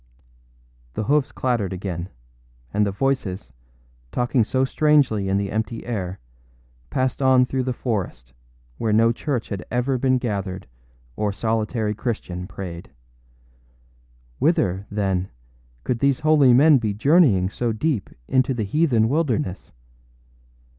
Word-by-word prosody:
â -, -, -34 dB
The -, -, -1 dB
hoofs 145 Hz, +5 st, +1 dB
clattered 120 Hz, -7 st, -1 dB
again; 90 Hz, -1 st, -4 dB, 0.6 s
and 105 Hz, 0 st, +2 dB
the -, -, -1 dB
voices, 100 Hz, -, -2 dB, 0.6 s
talking 125 Hz, 0 st, +1 dB
so 130 Hz, +4 st, +1 dB
strangely 135 Hz, -9 st, +2 dB
in 95 Hz, -, +2 dB
the 100 Hz, -1 st, -2 dB
empty 110 Hz, +1 st, -3 dB
air, 95 Hz, -6 st, -4 dB, 0.7 s
passed 130 Hz, +1 st, -1 dB
on 130 Hz, -1 st, +5 dB
through 130 Hz, +1 st, -2 dB
the 130 Hz, 0 st, -1 dB
forest, 95 Hz, -, -4 dB, 0.5 s
where 110 Hz, -, 0 dB
no 115 Hz, +2 st, +4 dB
church 125 Hz, -1 st, -3 dB
had 100 Hz, -3 st, -4 dB
ever 125 Hz, +2 st, 0 dB
been 130 Hz, 0 st, +2 dB
gathered 100 Hz, -6 st, -3 dB, 0.5 s
or 105 Hz, -1 st, -1 dB
solitary 110 Hz, +1 st, -1 dB
Christian 100 Hz, -5 st, -4 dB
prayed. 90 Hz, -4 st, -8 dB, 1.5 s
Whither, 95 Hz, +3 st, +1 dB
then, 95 Hz, -3 st, -1 dB, 0.5 s
could 120 Hz, -, -1 dB
these 140 Hz, +2 st, +2 dB
holy 150 Hz, -4 st, +5 dB
men 140 Hz, +3 st, +6 dB
be 105 Hz, -3 st, -2 dB
journeying 115 Hz, -, +4 dB
so 120 Hz, +1 st, -1 dB
deep 115 Hz, -, -1 dB, 0.2 s
into 130 Hz, 0 st, +2 dB
the 110 Hz, -, -1 dB
heathen 120 Hz, -2 st, +2 dB
wilderness? 125 Hz, -, -1 dB
110 Hz, 130 wpm, -23 LUFS, 95-130 Hz, 1.5 s, men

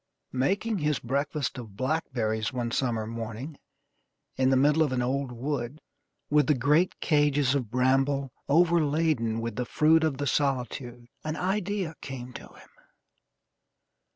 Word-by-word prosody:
Making 195 Hz, -, 0 dB
his 150 Hz, -2 st, +1 dB
breakfast 140 Hz, +2 st, -2 dB
of 105 Hz, -5 st, -10 dB
blackberries 120 Hz, -6 st, -1 dB
one 120 Hz, -2 st, -3 dB
September 115 Hz, -4 st, 0 dB
morning, 115 Hz, +6 st, -6 dB, 0.8 s
in 130 Hz, 0 st, +2 dB
the 135 Hz, -, +4 dB
middle 145 Hz, +4 st, +4 dB
of 150 Hz, -4 st, +2 dB
an 125 Hz, -1 st, 0 dB
old 135 Hz, +1 st, -1 dB
wood, 130 Hz, +2 st, -3 dB, 0.5 s
with 150 Hz, -2 st, +3 dB
the 150 Hz, -, +4 dB
great 150 Hz, +8 st, +2 dB
cages 145 Hz, -3 st, +3 dB
of 130 Hz, -6 st, -1 dB
bramble 135 Hz, +2 st, +1 dB, 0.2 s
overladen 155 Hz, -7 st, +2 dB
with 115 Hz, -1 st, -4 dB
the 125 Hz, -, 0 dB
fruit 160 Hz, +5 st, +4 dB
of 155 Hz, -4 st, 0 dB
the 145 Hz, -, -2 dB
solitude, 125 Hz, -3 st, -1 dB, 0.2 s
an 155 Hz, 0 st, -3 dB
idea 190 Hz, -2 st, -1 dB
came 125 Hz, -2 st, -7 dB
to -, -, -9 dB
him. -, -, -18 dB
135 Hz, 140 wpm, -27 LUFS, 125-150 Hz, 0.8 s, the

